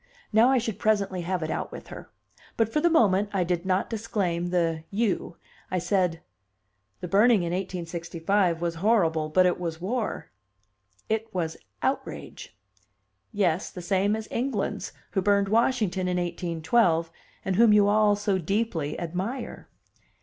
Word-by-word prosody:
Now 225 +4 +6
I 265 - +4
should 225 -3 -2
presently 200 -4 +1
have 180 0 -2
it 155 - -3
out - - -3
with - - -10
her. - - -10 0.5
But, 225 -1 +1
for 300 - +2
the 345 - +4
moment, 205 - +3
I 190 -2 +2
did 175 +1 -2
not 185 0 +1
disclaim 200 -6 -2
the 165 -3 0
"you." 200 -5 -1 0.3
I 185 - -1
said: 180 -2 0 0.8
"The 180 - -4
burning 205 +2 +4
in 170 - -2
1865 175 0 -1
was 170 -1 -1
horrible, 165 -8 +2
but 185 +4 +4
it 180 - +1
was 165 -2 -4
war." 215 +5 -3 0.8
"It 220 +1 -2
was 165 -3 -1 0.3
outrage." - - -4 0.7
"Yes, 185 -3 0
the 180 - -9
same 195 +3 +1
kind - - 0
as 220 -1 -7
England's, 240 -4 -2 0.2
who 195 - 0
burned 200 0 +2
Washington 215 -5 +1
in 180 0 0
1812, 170 0 +1 0.3
and 190 -1 0
whom 230 -1 +6
you 205 -1 +5
all 210 0 +4
so 200 -2 0
deeply 180 -4 -1
admire." 185 +10 -5
190 Hz, 155 wpm, -26 LUFS, 175-215 Hz, 0.8 s, Now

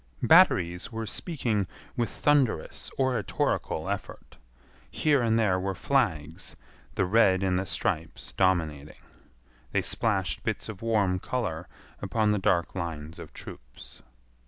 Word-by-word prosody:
Batteries 90 +5 +5
were 110 -1 -4
speaking 115 - -1 0.3
with 120 -1 0
thunderous 140 - +1
oratorical 130 -5 0
effort. - - -6 0.5
Here 145 -4 +2
and 115 -1 +2
there 100 -5 +2
were 95 +1 -2
flags, 85 - -1 0.4
the 95 - +2
red 95 -1 +4
in 95 -1 +1
the 95 +1 -2
stripes - - -3
dominating. 80 -6 0 0.8
They - - +2
splashed 95 -5 -1
bits - - -2
of 105 -4 -8
warm 105 -5 +1
color 90 -8 -3 0.3
upon 110 -2 +1
the 105 - +1
dark 85 -2 +1
lines 80 -3 -5
of - - -9
troops. - - -11
95 Hz, 125 wpm, -28 LUFS, 85-115 Hz, 0.8 s, Batteries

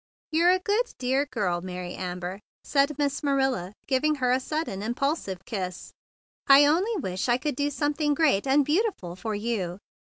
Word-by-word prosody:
"You're 335 +3 +4
a 370 - +5
good, 415 +6 -1
dear 265 +3 0
girl, 195 -9 -1
Mary 180 -1 -6
Am¬ 180 -1 -4
ber," 180 +2 -5 0.2
said 280 0 +1
Miss 285 -1 0
Marilla, 270 - 0
giving 290 +3 +1
her 255 -3 +1
a 255 - +3
sudden 305 -8 -3
impulsive 240 - -2
kiss. 185 -5 -5 0.5
"I 275 +1 +8
only 365 +10 +2
wish 190 - -2
I 240 - +4
could 290 +1 -3
do 285 +1 0
something 295 +1 0
great 275 -9 +2
and 275 +1 +4
beauti¬ 400 - +1
ful 175 -1 -8
for 215 +3 -4
you." 205 -5 -2
265 Hz, 175 wpm, -26 LUFS, 195-295 Hz, 0.5 s, I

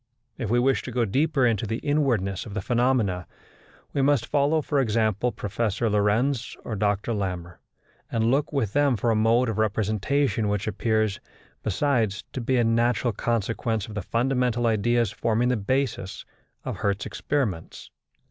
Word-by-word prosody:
If 120 -6 -4
we 120 - +3
wish 130 +2 +2
to 125 - -7
go 120 -1 +1
deeper 135 +5 +2
into 115 -2 +1
the 115 - -2
inwardness 120 -10 0
of 105 - -8
the 105 - -1
phenomena, 120 -7 +1 0.7
we 140 - +1
must 140 -3 +3
follow, 145 +2 +2
for 145 - 0
example, 110 -1 +1
Professor 110 +1 -1
Lorentz 110 +5 +1
or 110 - -4
Dr 105 +2 0
Larmor, 90 -4 -4 0.5
and 115 0 +1
look 140 +2 +1
with 120 -9 -1
them 145 -3 +3
for 115 +3 +1
a - - +2
mode 115 +3 +3
of 110 -1 -2
representation 110 +4 +1
which 105 -1 -1
appears, 110 -2 0 0.4
besides, 110 -2 0
to 130 - -3
be 130 +2 +1
a 120 - +3
natural 115 +1 +2
consequence 115 -1 -1
of 110 - -9
the 105 - -3
fundamental 125 +2 0
ideas 115 0 +2
forming 115 +3 +1
the 125 - +2
basis 110 -3 -2 0.4
of - - -4
Hertz's 100 0 -1
experiments. 120 - -3
115 Hz, 160 wpm, -25 LUFS, 105-125 Hz, 0.7 s, we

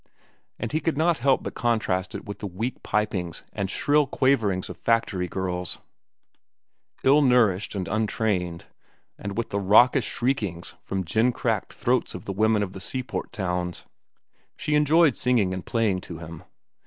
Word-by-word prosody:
And - - -4
he 155 - +1
could 160 -1 -1
not 165 +1 +2
help 135 -1 +2
but - - -5
contrast 110 -6 0
it - - -6
with 100 - -7
the 105 - -4
weak 110 +7 -4
pipings 100 -5 -2
and 100 -3 -2
shrill 145 +6 +2
quaverings 115 - +1
of - - -8
factory 110 -6 +1
girls, 90 -1 -2 1.3
ill 140 +3 +6
nourished 115 -8 +3
and 95 -2 -3
untrained, 105 -6 -1 0.5
and 100 +1 -5
with 115 - -2
the 100 - 0
raucous 105 +6 +5
shriekings 105 -9 -2
from 95 -1 -3
gin 110 +8 +2
cracked - - -2
throats - - 0
of - - -8
the 100 - -3
women 110 +1 +2
of 95 -2 -5
the 95 - -8
seaport 130 +5 -4
towns. 90 -5 -3 0.7
She 150 - -2
enjoyed 150 0 +4
singing 115 -7 +2
and 95 -1 -5
playing 110 -5 0
to 85 - -8
him. 85 -1 -10
105 Hz, 160 wpm, -25 LUFS, 95-125 Hz, 1.3 s, ill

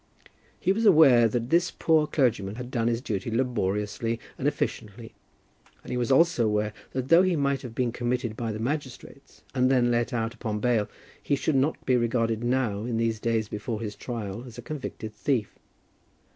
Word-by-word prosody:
He 185 - +2
was 225 +3 -1
aware 140 - +7
that 120 +2 -3
this 175 +2 +3
poor 160 -2 +2
clergyman 110 -9 0
had 125 +1 -7
done 115 -3 0
his 120 0 0
duty 105 -3 -3
laboriously 115 -1 -1 0.2
and 135 - -2
efficiently, 115 -5 -3 0.7
and - - -9
he - - -1
was 125 +2 0
also 150 -5 +4
aware 105 0 0 0.2
that 130 0 -3
though 165 +2 +7
he 185 -2 +2
might 140 -2 0
have 120 -3 -9
been 125 -1 0
committed 120 -1 -2
by 115 -1 -3
the 105 - -4
magistrates, 135 +2 -6
and 130 -1 +2
then 125 -2 +3
let 120 0 0
out 115 -1 -2
upon 110 -3 -4
bail, 115 -2 +1 0.3
he 140 - +1
should 140 +3 -1
not 135 +4 0
be 130 - +3
regarded 115 -1 0
now, 120 -4 0
in 115 0 -2
these 115 -1 0
days 115 -1 0
before 105 +2 -4
his 105 -2 -5
trial, 110 -1 -5
as 120 -1 -12
a 120 - -8
convicted 120 -6 -6
thief. 125 -8 -1
120 Hz, 185 wpm, -26 LUFS, 110-130 Hz, 0.7 s, aware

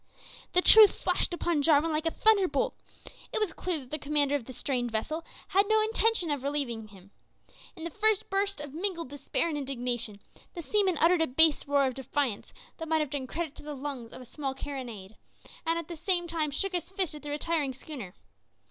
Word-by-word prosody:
The 360 - +5
truth 435 -2 +9
flashed - - +1
upon 345 -3 0
Jarwin 310 +2 +3
like 310 +1 -1
a - - +1
thunderbolt. 385 -11 +3 0.6
It - - -1
was 415 -7 -1
clear 360 0 0
that 255 - -14
the 305 - 0
commander 290 -1 +1
of 280 -5 -1
the 260 - -9
strange 250 -1 -2
vessel 270 +9 -3 0.3
had 395 +2 +3
no 435 0 +4
intention 440 -5 +1
of 285 -3 -2
relieving 265 -6 -2
him. 200 -1 -17 0.6
In 325 - -10
the 335 - -4
first 430 +1 +2
burst 395 -1 -1
of 290 -2 -8
mingled 340 -3 -2
despair 285 +4 -2
and 305 -3 -2
indignation, 245 -6 -3 0.4
the 340 - -6
seaman 385 -2 +1
uttered 340 +1 +4
a 320 - +2
bass 310 +3 +4
roar 280 -1 +3
of 260 - -1
defiance 265 -3 -3 0.3
that 325 - -6
might 320 0 +2
have 295 -3 -3
done 270 -3 -3
credit 320 +1 -4
to - - -10
the 295 0 -6
lungs 265 -4 -6
of - - -10
a - - -11
small 270 +1 -5
carronade, 240 -8 -7 0.5
and 330 0 +2
at 335 -2 -5
the 345 - -7
same 350 +2 0
time 325 -3 -1
shook 380 +7 -2
his 355 -1 -2
fist 380 -5 -1
at 300 - -8
the 295 - -8
retiring 295 -2 -1
schooner. 250 - -8
300 Hz, 210 wpm, -29 LUFS, 270-345 Hz, 0.6 s, truth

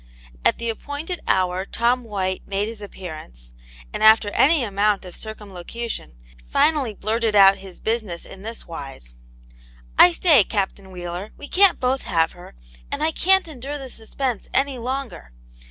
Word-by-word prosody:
At - - +3
the 235 - -4
appointed 290 +9 -5
hour 185 0 +1
Tom 240 +5 0
White 190 -4 -2
made 200 +1 -1
his 225 -1 -8
ap 205 - -8
pearance, 105 - -9 0.4
and - - -4
after 220 -1 +6
any 295 +3 +4
amount 205 -1 +1
of 180 - -9
circumlocuti<5n, 215 - -7 0.3
finally 270 - +2
blurted 220 +1 -1
out 195 -1 +7
his 190 -2 -10
business 220 -7 -3
in 190 - -10
this 225 +2 -7
wise: 135 - -8 0.9
I 175 - +9
say, 300 - +5
Captain 195 -1 -3
Wheeler, 180 +2 -6
we 290 - -9
can't 385 +1 +5
both 260 +1 +1
have 165 -3 +1
her 175 - -14 0.4
and - - -2
I 320 - +2
can't 380 +3 +3
endure 285 -1 -6
this 265 -3 -8
suspense 235 +1 -4
any 270 -1 +1
longer. 250 - -5
215 Hz, 155 wpm, -22 LUFS, 185-255 Hz, 0.9 s, I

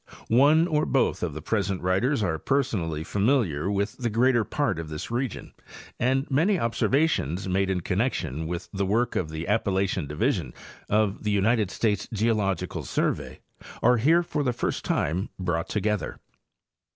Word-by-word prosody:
One 145 +7 +5
or 155 -3 +1
both 135 - +1
of 80 -5 -2
the 75 - -7
present 100 -3 -1
writers 105 +8 +1
are 80 -5 -1
per 140 - +2
sonally 80 - -3
familiar 100 - +1
with 100 +2 -2
the 120 -2 -1
greater 120 +1 +3
part 110 - -1
of 80 -2 -6
this 75 +7 -6
region, 125 +1 -3 0.5
and 130 +2 +2
many 175 +9 +3
observations 115 - +1
made 95 +1 +1
in 95 -2 0
connection 85 - -1
with 85 0 -4
the 100 -1 -1
work 115 +5 +1
of 80 - -1
the 80 +1 -5
Appa 105 0 +1
lachian 95 -4 0
division 75 +1 -1 0.3
of 105 -1 +1
the 105 - 0
United 105 0 +2
States 105 0 -1
Geological 105 -4 0
Survey - - -2 0.4
are 125 +1 +5
here 160 +9 +4
for 150 -3 -2
the 125 -3 0
first 120 - -2
time 85 +6 -1
brought 90 -2 -2
together. 105 -4 -1
105 Hz, 165 wpm, -26 LUFS, 90-125 Hz, 0.5 s, One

